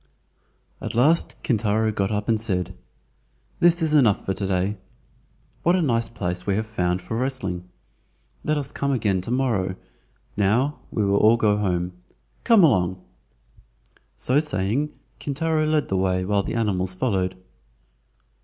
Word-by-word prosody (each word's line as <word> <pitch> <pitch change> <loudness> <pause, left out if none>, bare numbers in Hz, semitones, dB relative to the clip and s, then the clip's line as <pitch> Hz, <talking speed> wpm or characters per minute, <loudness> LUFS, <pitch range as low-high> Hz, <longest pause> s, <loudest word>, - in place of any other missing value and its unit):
At - - -5
last 150 +8 +3
Kintaro 110 -3 +1
got 100 -2 -1
up 105 -1 -2
and 110 -2 +1
said: 90 -6 -1 0.9
"This 170 0 +4
is 155 -1 +1
enough 120 -9 +4
for 95 - 0
to 100 0 -3
day. 95 +2 0 0.8
What 175 +2 +3
a 185 - +2
nice 115 -5 +1
place 90 -5 -4
we 100 - +2
have 110 +2 -1
found 90 -4 -1
for 100 +5 -5
wrestling; 100 -9 -2 0.7
let 155 - 0
us 140 -2 -3
come 140 0 -1
again 105 -7 +1
to 95 - -6
morrow. 115 -8 0 0.6
Now, 115 +9 +1
we 105 - -1
will 100 0 +2
all 110 +3 +5
go 105 -2 +3
home. 90 -4 -1 0.5
Come 225 -5 +6
along!" 95 - +3 1.2
So 130 +3 +2
saying, 140 0 0 0.3
Kintaro 155 +2 0
led 155 -1 +1
the 95 - 0
way 95 -1 0
while 100 +1 +1
the 100 - -4
animals 95 -5 -1
followed. 95 -5 0
110 Hz, 150 wpm, -23 LUFS, 95-135 Hz, 1.2 s, Come